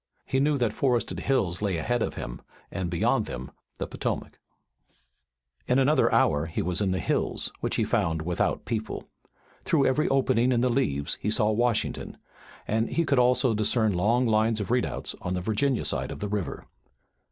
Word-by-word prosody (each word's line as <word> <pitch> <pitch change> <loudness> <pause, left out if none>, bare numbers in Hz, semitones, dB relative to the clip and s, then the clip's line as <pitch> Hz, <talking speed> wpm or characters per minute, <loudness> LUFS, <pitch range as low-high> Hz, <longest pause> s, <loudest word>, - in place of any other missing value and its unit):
He 130 - 0
knew 145 +1 +2
that 120 -5 0
forested 125 -1 0
hills 105 -10 0
lay 100 -4 0
ahead 120 +9 -1
of - - -2
him - - -6 0.3
and 95 -3 -3
beyond 85 -1 +1
them 65 +2 -6 0.3
the - - -3
Potomac. - - -4 1.3
In 125 - +3
another 140 +3 +3
hour 75 +2 +3
he 80 - -2
was 90 +3 -1
in 100 - +1
the 95 - 0
hills, - - -1
which - - -1
he - - +1
found 80 -1 0
without 85 +1 -1
people. 110 -2 -4 0.6
Through 145 -5 +2
every 150 +4 +2
opening 130 -2 +2
in 120 -2 +2
the 125 0 +2
leaves 70 - -1
he 105 - -1
saw 110 0 +3
Washington 115 0 -1 0.5
and 110 +2 0
he 170 - 0
could 140 -3 +2
also 125 0 +3
discern 110 0 +1
long 115 +8 +2
lines 110 0 +2
of 105 - -3
redoubts 125 0 0
on 90 +1 -2
the - - -1
Virginia 110 +6 0
side - - 0
of - - -6
the 105 - -3
river. 100 -3 -3
110 Hz, 180 wpm, -27 LUFS, 95-125 Hz, 1.3 s, In